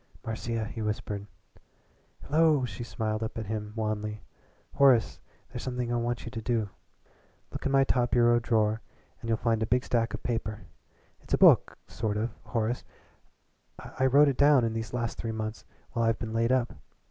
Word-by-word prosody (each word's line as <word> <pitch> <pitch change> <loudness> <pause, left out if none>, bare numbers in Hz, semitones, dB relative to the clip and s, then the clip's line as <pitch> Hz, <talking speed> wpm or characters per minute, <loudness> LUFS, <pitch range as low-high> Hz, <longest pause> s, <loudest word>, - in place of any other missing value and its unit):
"Marcia," 115 0 -3
he 115 +1 -6
whispered. 105 -1 -3 1.0
"Hello!" 155 -3 +3
She 120 0 -6
smiled 110 -2 -3
up 110 +1 -4
at 110 - -3
him 105 0 -4
wanly. 105 -1 -3 0.5
"Horace, 130 -5 +4 0.3
there's - - -7
something 125 -2 -3
I - - +1
want 120 0 -2
you 115 - -6
to 115 - -5
do. 110 -3 -1 0.8
Look - - -3
in - - -1
my 135 0 +5
top 125 -2 +1
bureau 120 -1 +4
drawer 110 -1 +1 0.4
and 115 - -7
you'll 115 - +2
find 115 -1 0
a 110 - 0
big 125 +1 +2
stack 115 -1 0
of - - -8
paper. 110 -4 -3 0.5
It's - - -1
a - - -2
book - - +6
sort 105 -1 -2
of 110 +2 -1
Horace. 115 +2 -1 0.9
I 130 0 -1
wrote 145 +3 +6
it 140 - 0
down 140 -3 +5
in 115 - -1
these 115 0 -4
last 120 -2 -3
three 115 - -3
months 110 0 -5 0.3
while 115 -2 0
I've 115 0 +2
been 110 -1 -5
laid 115 +2 +1
up. 125 -2 +1
115 Hz, 180 wpm, -28 LUFS, 110-125 Hz, 1.0 s, book